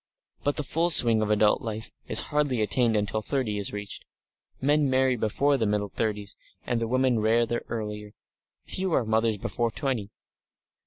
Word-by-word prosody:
But 145 - 0
the 150 - -2
full 165 +5 0
swing 115 -8 +7
of 105 - -1
adult 105 0 +3
life 110 0 -6 0.2
is - - +3
hardly 145 -5 +1
attained 115 +1 +2
until 105 +1 -1
thirty 110 -3 -2
is 100 - 0
reached. 100 -1 -7 0.6
Men 145 +1 +2
marry 130 0 +2
before 135 +6 +1
the 110 -4 0
middle 105 -1 -1
thirties, 105 -1 -3 0.3
and 120 -1 -1
the 115 - -1
women 130 -1 +1
rather 115 +2 +1
earlier, 105 -2 -6 0.5
few 185 -2 -3
are 125 - +1
mothers 110 0 +1
before 120 +4 -2
five - - -15
and - - -13
twenty. 125 -8 -2
115 Hz, 175 wpm, -26 LUFS, 105-130 Hz, 0.6 s, swing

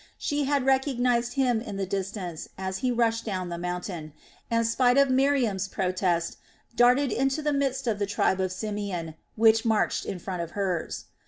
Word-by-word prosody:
She 290 -1 -1
had 280 -1 +1
recognized 250 -3 +2
him 250 -5 +2
in 205 -4 -6
the 195 - -1
distance 190 -3 -4
as 190 0 -3
he 255 - 0
rushed 230 -1 +1
down 185 -4 -3
the 170 0 -4
mountain 175 -3 -4 0.4
and, 230 0 +2
spite 245 +3 +3
of 280 -1 +5
Miriam's 255 -8 +2
protest, 180 -3 -1 0.4
darted 250 +3 +4
into 270 +4 0
the 295 0 +1
midst 275 -2 0
of 220 -4 0
the 205 - 0
tribe 190 -1 +1
of 185 -1 -1
Simeon 190 -4 -4 0.2
which 225 0 +5
marched 220 -3 +1
in 190 - -3
front 180 0 -4
of 170 -1 -5
hers. 185 -4 -2
220 Hz, 175 wpm, -27 LUFS, 185-255 Hz, 0.4 s, of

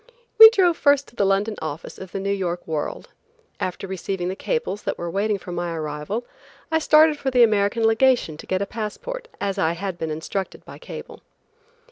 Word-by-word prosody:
We 445 0 +13
drove 365 -7 +2
first 285 -1 +3
to - - -23
the 200 - +2
London 200 +2 0
office 155 0 -6
of 190 -1 -9
the - - -4
New 200 +1 -1
York 180 -3 -3
World. 155 -2 -4 0.5
After 185 +1 -3
receiving 190 -1 -3
the 190 - -3
cables 470 - -2
that - - -3
were 170 0 -4
waiting 205 +2 0
for 180 - -9
my 175 -1 -3
arrival, 155 +9 -4 0.5
I 320 - +3
started 310 -1 +5
for 270 - -1
the 250 -2 +5
American 215 +1 +2
Legation 225 -6 +3
to - - -11
get 185 +1 0
a - - -3
passport 235 - -6
as 200 0 -2
I 165 -3 +2
had 185 0 -5
been 160 - -3
instructed 160 +5 -5
by - - -11
cable. - - -9
200 Hz, 195 wpm, -23 LUFS, 175-250 Hz, 0.5 s, We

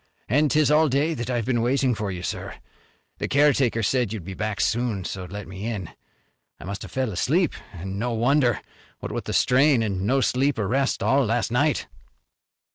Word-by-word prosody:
"An' 150 +6 +3
'tis 150 0 +3
all 155 0 +4
day 145 +5 +1
that 120 -4 -4
I've 120 -3 -1
been 120 -2 +1
waiting 130 +1 +2
for 105 -2 -3
you, 90 -2 -5
sir. - - -4 0.6
The - - -2
caretaker 135 -5 +3
said 125 -1 +1
you'd 110 -5 -5
be 95 +3 -7
back 105 +1 -3
soon 115 -4 0
so 95 -1 -5
let 100 +2 -7
me 95 +4 -6
in. 100 -8 -4 0.7
I - - -10
must 100 +2 -5
have - - -8
fell 130 -4 -1
asleep, 160 - +1 0.2
an' 95 +2 -6
no 120 +2 -1
wonder, 120 +1 +2 0.4
what - - -6
with - - -4
the - - -4
strain 130 -1 +4
an' 95 -3 -2
no 130 +7 +2
sleep 135 +2 +1
or 105 -3 -1
rest 135 +5 0
all 135 +1 +3
last 115 0 0
night." 145 +5 +1
120 Hz, 200 wpm, -24 LUFS, 105-135 Hz, 0.7 s, all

